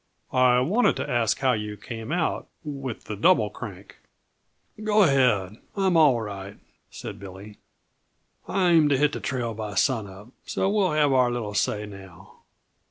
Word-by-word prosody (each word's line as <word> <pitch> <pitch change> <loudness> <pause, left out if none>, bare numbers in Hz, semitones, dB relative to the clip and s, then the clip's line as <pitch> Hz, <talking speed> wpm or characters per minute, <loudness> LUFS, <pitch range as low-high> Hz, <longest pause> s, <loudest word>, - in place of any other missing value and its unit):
"I 125 -1 +4
wanted 200 - +2
to - - -4
ask 120 -4 +1
how 135 -1 +2
you 105 -2 -3
came 115 +3 -7
out 170 0 -1 0.2
with 135 -5 -6
the 105 - -6
Double 110 - +3
Crank." - - -10 0.9
"Go 215 -1 +4
ahead; 125 - +2 0.2
I'm 190 -2 +2
all 150 -7 +5
right," 100 -2 -7 0.3
said 100 - -8
Billy. 100 +2 -11 0.9
"I 185 -2 +2
aim 160 -3 +5
to 140 - +3
hit 145 +1 +3
the - - -5
trail 120 -4 -3
by 105 -1 -6
sun 115 -2 +1
up, 100 +4 -13
so - - -1
we'll 195 -6 +1
have 150 -2 +3
our 125 -2 +4
little 120 -4 -3
say 105 0 0
now." 95 -4 -13
120 Hz, 165 wpm, -25 LUFS, 105-150 Hz, 0.9 s, all